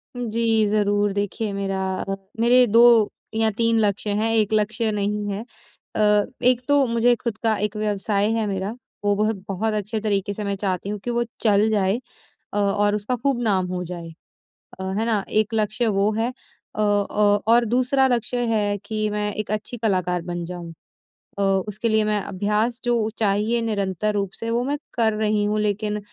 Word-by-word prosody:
जी, 225 -2 +1
ज़रूर 205 -1 +1
देखिए, 205 +1 -2
मेरा 190 -1 -2 0.4
मेरे 245 +2 +5
2 230 0 +6 0.2
या 220 0 +3
3 230 +1 +1
लक्ष्य 210 0 0
हैं, 215 +2 +1
एक 215 -1 +2
लक्ष्य 220 +1 +1
नहीं 210 0 -1
है। 200 - -3 0.5
अ, 210 -1 +4 0.2
एक 250 -1 +4
तो 285 -1 +4
मुझे 235 +1 +3
खुद 230 -3 -2
का 225 -1 +3
एक 210 +1 -2
व्यवसाय 205 0 0
है 225 -1 0
मेरा 195 0 -2 0.3
वो 205 0 +3
बहुत-बहुत 210 0 -1
अच्छे 215 +1 -2
तरीके 205 -2 -1
से 210 +1 -5
मैं 200 0 -1
चाहती 195 -1 -2
हूँ 210 0 -3
कि 245 - -2
वो 240 0 +1 0.2
चल 210 0 +4
जाए 205 0 +1 0.5
अ, 205 - -1
और 205 0 +2
उसका 210 +4 -1
खूब 255 0 0
नाम 195 -5 +1
हो 180 0 -3
जाए, 170 -1 -7 0.7
अ, - - -4 0.2
है 225 - 0
ना? 215 -4 +1
एक 215 +1 +1
लक्ष्य 220 +2 0
वो 200 0 +2
है। 235 +3 0 0.4
अ 215 - -1
अ, - - +3 0.6
और 235 +1 +5
दूसरा 255 +3 +2
लक्ष्य 245 0 0
है 205 -1 0
कि 215 0 -1
मैं 210 0 -1
एक 215 0 -4
अच्छी 215 +3 -3
कलाकार 185 -5 0
बन 175 0 -4
जाऊँ 170 -1 -7 0.7
औ 200 - +2 0.2
उसके 210 +3 -2
लिए 220 0 +3
मैं 210 -1 +1
अभ्यास 210 +5 -1
जो 235 -3 +1
चाहिए 215 +2 +1
निरंतर 210 -2 -1
रूप 200 -2 -1
से 230 - -5
वो 240 +1 +1
मैं 285 +3 -1 0.2
कर 225 -2 +2
रही 215 -1 +1
हूँ। 210 +1 0
लेकिन 210 0 -1
210 Hz, 180 wpm, -23 LUFS, 200-225 Hz, 0.7 s, 2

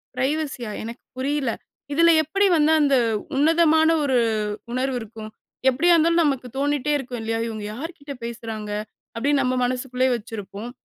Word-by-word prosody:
ப்ரைவசியா? 265 -3 -2
எனக்கு 230 +1 -8
புரியல. 270 -1 0 0.4
இதுல 335 +3 +5
எப்டி 390 +7 +1
வந்து 305 0 +4
அந்த 280 -2 +4 0.4
உன்னதமான 320 +2 +4
ஒரு 265 -3 +2 0.5
உணர்வு 255 +1 -1
இருக்கும். 220 0 -9 0.4
எப்படியா 330 +8 +3
இருந்தாலு 335 +1 +3
நமக்கு 270 -4 0
தோனிட்டே 290 +1 0
இருக்கும். 250 -3 -6
இல்லையா? 225 0 -2
இங்வுக 215 -2 -5
யார்கிட்ட 285 +2 -7
பேசுறாங்க 225 -2 -6 0.4
அப்டின்னு 280 +4 +1
நம்ம 255 0 0
மனசுக்குள்ளேயே 255 +1 0
வச்சிருப்போம். 210 0 -7
265 Hz, 135 wpm, -23 LUFS, 235-295 Hz, 0.5 s, இதுல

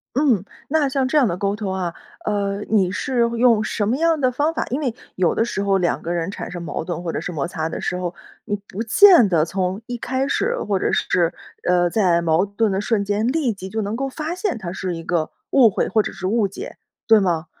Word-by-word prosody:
嗯， 260 - +3 0.3
那 295 -1 +2
像 265 -1 0
这 300 - +1
样 270 -5 +5
的 175 -3 -2
沟 200 +1 -1
通 205 -2 -4
啊， 180 -3 -2 0.3
呃， 200 -1 -1
你 195 -4 +3
是 245 +6 -2 0.2
用 230 -3 +4
什 215 -1 -1
么 240 +5 +1
样 325 0 +2
的 255 -2 +2
方 295 +6 0
法？ - - -2
因 260 - 0
为 255 -7 -2 0.2
有 185 -2 +1
的 225 - +2
时 200 - -3
候 200 -1 +2
两 175 -2 0
个 170 - -4
人 170 +1 -2
产 - - -6
生 175 -1 -6
矛 165 - -4
盾 175 +1 -4
或 170 - -2
者 - - -2
是 - - -4
摩 155 -2 -2
擦 160 -3 -3
的 - - -5
时 180 - -2
候， 180 -1 -4 0.3
你 205 - -1
不 200 - -6
见 290 - +7
得 165 -4 +3
从 185 +3 -2
一 245 - -5
开 260 +3 -1
始， 480 +11 0
或 200 -2 +1
者 - - 0
是， 170 -2 +1 0.3
呃 175 0 +3
在 175 -3 +2
矛 165 +3 +3
盾 205 +1 0
的 190 +1 0
瞬 205 -1 0
间， 205 +3 0
立 260 -3 +1
即 190 -1 -8
就 220 +3 -2
能 205 +2 -3
够 270 +3 -2
发 310 +4 -4
现 365 - -2
它 185 -6 -6
是 185 -2 -3
一 165 - -7
个 165 -2 -1 0.2
误 255 -5 +6
会， 195 - -1
或 215 +3 +2
者 - - -4
是 185 -1 -7
误 210 +2 +2
解， 395 - -8 0.3
对 225 -2 +7
吗？ 170 -5 0
205 Hz, 265 characters per minute, -21 LUFS, 180-250 Hz, 0.3 s, 见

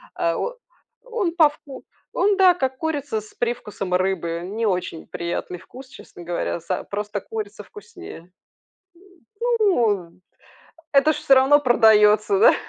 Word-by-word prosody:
А, 165 0 0
о - - -3 0.5
он 450 -9 -3
по 320 -4 +6
вку 290 -2 -13 0.3
он 400 0 +2
да, 375 -2 +6
как 265 -6 -3
курица 290 -7 -3
с 210 - -17
привкусом 210 -6 -4
рыбы. 180 -2 -1
Не 215 +5 -3
очень 180 -4 -3
приятный 170 +1 -5
вкус, 255 +8 -13
честно 175 - -13
говоря, 170 0 -3
за 180 +2 -4
просто 205 0 -5
курица 440 -1 -7
вкуснее. 365 - -13 1.3
Ну 215 - +1 0.8
это 285 +2 +4
ж - - -5
всё 275 - +4
равно 270 +2 +5
продается 220 - +4
да, 465 +4 +6
240 Hz, 135 wpm, -22 LUFS, -, 1.3 s, по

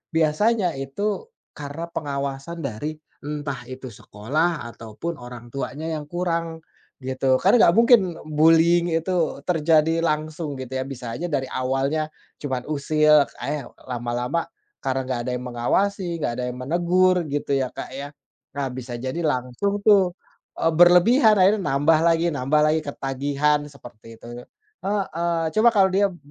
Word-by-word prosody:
biasanya 180 +5 +2
itu 200 - -3 0.3
karena 145 +3 -6
pengawasan 140 +3 -4
dari, 145 +6 -4 0.3
entah 145 -3 -4
itu 130 0 -8
sekolah 150 +11 -2
ataupun 115 +10 -6
orangtuanya 125 +5 -6
yang 150 -1 -5
kurang. 165 -2 -2 0.4
Gitu, 130 0 +1
kan 195 - +5
enggak 170 - +6
mungkin 220 -8 +5
bullying 165 +3 +4
itu 165 +3 -3 0.3
terjadi 165 -1 +2
langsung 155 -2 -2
gitu 130 0 -7
ya, 130 - -1
bisa 125 -4 -6
aja 165 +9 -4
dari 140 -4 -1
awalnya 135 +4 -1 0.3
cuman 130 -4 -3
usil, 150 0 +4
ka - - -13
yaw 145 -5 -5 0.2
lama-lama 125 +5 -2 0.3
karena 130 0 0
enggak 130 -2 -2
ada 125 - -2
yang 125 - -8
mengawasi, 170 +9 -1
enggak 120 - 0
ada 125 - -2
yang 125 - -7
menegur, 175 +5 +2
gitu 145 0 -3
ya 135 -2 0
Kak - - -7
ya? 140 +1 -6 0.5
Nah 140 -1 -1
bisa 125 -1 -7
jadi 130 +6 -4
langsung 150 +7 -1
tuh, 195 -4 +5 0.4
e - - -4
berlebihan 180 - +6
akhirnya 200 +3 +4
nambah 155 0 +3
lagi, 165 +1 +3
nambah 145 +3 +1
lagi, 155 +1 +2
ketagihan 145 +2 0
seperti 115 -5 -14
itu - - -16 0.6
heeh. 170 -4 -1 0.2
Coba 225 +2 +6
kalo 195 -2 +6
dia 200 +1 +4
b - - -14
150 Hz, 145 wpm, -23 LUFS, 130-170 Hz, 0.6 s, enggak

